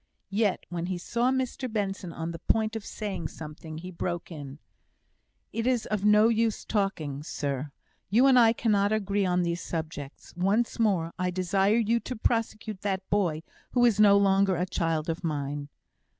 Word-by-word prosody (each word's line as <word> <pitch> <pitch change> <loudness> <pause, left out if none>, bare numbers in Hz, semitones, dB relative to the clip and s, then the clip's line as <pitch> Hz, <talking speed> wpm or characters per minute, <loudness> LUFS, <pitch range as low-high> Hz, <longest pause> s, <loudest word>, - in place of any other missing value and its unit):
Yet 205 -1 +1
when 175 -1 -3
he 185 -1 -2
saw 235 +8 0
Mr 260 -1 -2
Benson 195 -4 -2
on 165 +1 -4
the 165 - -7
point 220 +4 0
of 220 - -4
saying 200 -8 -4
something, 155 0 -9
he 180 +3 -7
broke 175 0 -4
in: 145 -3 -8 1.0
"It 230 +1 -1
is 245 -4 +1 0.2
no 210 +1 +6
use 230 -1 +1
talking, 160 -9 -1
sir. 145 -2 -3 0.4
You 230 +7 +5
and 260 -2 +7
I 230 -2 +7
cannot 210 -3 +2
agree 200 -2 +1
on 180 0 +2
these 170 0 -1
subjects. 155 -4 -6
Once 205 +8 +1
more, 185 -7 +1
I 180 0 +1
desire 190 +4 +2
you 230 0 +2
to 250 - -6
prosecute 220 -2 -1
that 190 -2 -2
boy, 170 -6 +1 0.3
who 245 -1 +4
is 220 -4 +3
no 200 -1 +7
longer 195 -1 +3
a 175 +2 0
child 165 -3 -1
of 165 +1 -3
mine." 145 -2 -3
195 Hz, 170 wpm, -28 LUFS, 165-220 Hz, 1.0 s, and